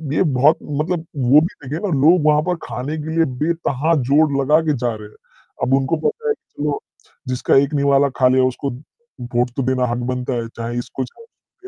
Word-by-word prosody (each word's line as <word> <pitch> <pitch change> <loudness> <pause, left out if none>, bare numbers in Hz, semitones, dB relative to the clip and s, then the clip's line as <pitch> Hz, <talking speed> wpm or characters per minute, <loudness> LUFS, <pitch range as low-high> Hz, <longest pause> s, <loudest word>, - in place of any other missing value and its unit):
ये - - +3
बहुत 145 0 +3
मतलब 160 +3 -2
वो 135 +2 +5
भी 165 - +1 0.2
देखिए 145 +4 -4
ना 205 - -2
लोग 160 +2 +5
वहाँ 150 0 +4
पर 180 +2 0
खाने 140 +5 -4
के 160 +1 -5
लिए 165 0 +3
बेतहा 160 -1 0 0.2
जोड़ 155 +2 +4
लगा 150 +3 +4
के 150 - +3
जा 120 -1 -1
रहे 105 -1 -10
हैं, - - -22 0.5
अब 130 - +1
उनको 135 +4 +1
पता 460 0 -4
है - - +3
कि - - -14
चलो 150 -1 -1 0.5
जिसका 130 0 +1
एक 140 +2 -4
निवाला 140 0 +3
खा 130 - +4
लिया 130 0 +3
उसको 130 +2 -2 0.7
वोट 120 +1 +2
तो 135 - 0
देना 130 0 +1
हक 120 - -1
बनता 125 0 -3
है, 115 -1 -3
चाहे 115 +1 -4
इसको, 130 +2 -5
चाहे 130 - -12
उसको 415 -4 -19
140 Hz, 215 wpm, -19 LUFS, 130-160 Hz, 0.7 s, वो